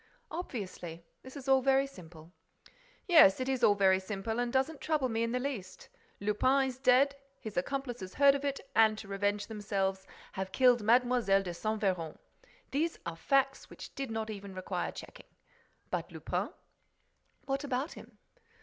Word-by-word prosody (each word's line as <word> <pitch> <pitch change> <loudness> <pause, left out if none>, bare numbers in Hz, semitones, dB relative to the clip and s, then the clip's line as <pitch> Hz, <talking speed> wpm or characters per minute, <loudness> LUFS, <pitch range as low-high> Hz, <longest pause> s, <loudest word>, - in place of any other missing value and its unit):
"Obviously. 185 - -6 0.2
This 260 +2 -11
is 275 -1 -9
all 265 -1 +5
very 270 +1 +3
simple." 170 - -13 0.8
"Yes, 320 - +7
it 255 - -2
is 260 -2 -1
all 210 -3 +6
very 190 -1 +4
simple 210 +4 -4
and 245 0 0
doesn't 270 +4 0
trouble 300 -5 0
me 225 0 -1
in 230 0 0
the 250 - 0
least. 250 -8 -5 0.3
Lupin 255 +7 +2
is 255 0 -9
dead, 265 +2 +4 0.2
his 215 -3 -8
accomplices 245 -1 -3
heard 280 0 +6
of 280 0 -3
it 280 -1 -1 0.2
and, 220 -1 +5
to 220 - -8
revenge 205 +1 -1
themselves, 195 -3 -2 0.2
have 190 0 -4
killed 250 -1 +4
Mlle. 245 +3 +3
de 195 -3 +1
Saint 215 +5 -3
Véran. 175 -5 -1 0.5
These 320 +4 0
are 170 -1 -4
facts 270 +8 +1
which - - -10
did 275 -2 -4
not 220 -1 -3
even 200 -2 -8
require 185 - -3
checking. - - -11 0.6
But - - -3
Lupin?" - - -3 1.0
"What 275 +1 -2
about 270 +1 -2
him?" - - -13
225 Hz, 165 wpm, -31 LUFS, 195-270 Hz, 1.0 s, Yes